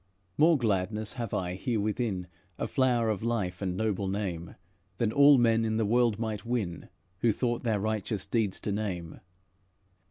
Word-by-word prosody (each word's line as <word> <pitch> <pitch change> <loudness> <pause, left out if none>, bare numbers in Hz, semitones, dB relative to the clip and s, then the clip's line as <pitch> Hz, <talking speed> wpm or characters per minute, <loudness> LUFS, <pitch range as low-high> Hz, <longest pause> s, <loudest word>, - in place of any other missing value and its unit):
"More 160 +1 +5
gladness 105 -2 -1
have 120 -5 -4
I, 90 -1 -2
herewithin, 105 -2 -1 0.3
Of - - -3
flower 120 -4 +2
of 100 - -3
life, 105 -7 -2
and 95 -2 -2
noble 100 -3 -1
name, 95 -4 -3 0.4
Than 115 -2 +1
all 140 +2 +7
men 115 -2 +3
in 110 0 0
the 110 - +1
world 115 0 +3
might 110 -3 -3
win, 110 -8 -3 0.3
Who 115 +2 +3
thought 120 +2 -1
their 110 -4 0
righteous 105 -1 -2
deeds 110 -5 0
to 105 - -2
name. 95 -5 -4
110 Hz, 160 wpm, -29 LUFS, 95-120 Hz, 0.4 s, all